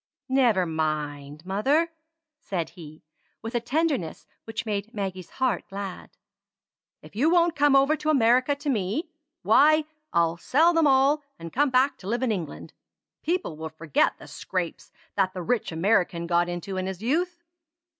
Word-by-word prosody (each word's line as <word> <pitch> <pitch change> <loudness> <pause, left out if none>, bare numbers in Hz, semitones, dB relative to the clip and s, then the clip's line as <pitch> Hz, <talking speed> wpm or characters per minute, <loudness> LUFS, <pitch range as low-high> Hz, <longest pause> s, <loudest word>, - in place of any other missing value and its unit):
"Never 240 -8 +3
mind, 150 -1 -3
mother!" 275 - +1 0.5
said 175 - -4
he, 160 -3 -12 0.4
with 225 +2 -5
a 240 - +1
tenderness 260 - -1 0.2
which 225 +1 -5
made 210 +2 -3
Maggie's 190 -3 -4
heart 260 -3 -1
glad. 195 -2 -6 0.9
"If 155 - -15
you 280 +9 +3
won't 345 -1 +3
come 290 -1 +4
over 275 +3 +4
to 305 - -2
America 255 0 +4
to 285 +1 -4
me, 230 - -2 0.3
why, 305 +7 +5 0.3
I'll 170 -1 +2
sell 315 - +3
them 325 -2 +4
all, 275 +2 +4 0.2
and 165 0 -9
come 290 +2 +3
back 260 +2 +2
to 190 - -10
live 240 +4 -1
in 250 - +1
England. 175 -8 -5 0.5
People 340 - -2
will 160 0 -5
forget 160 -1 0
the - - -13
scrapes 180 -3 -5 0.2
that 190 -2 +1
the 180 - -4
rich 235 +2 -1
American 175 0 +1
got 175 0 +1
into 175 +2 -5
in 185 0 -2
his 190 +1 -6
youth." 345 +7 -1
215 Hz, 160 wpm, -26 LUFS, 175-280 Hz, 0.9 s, why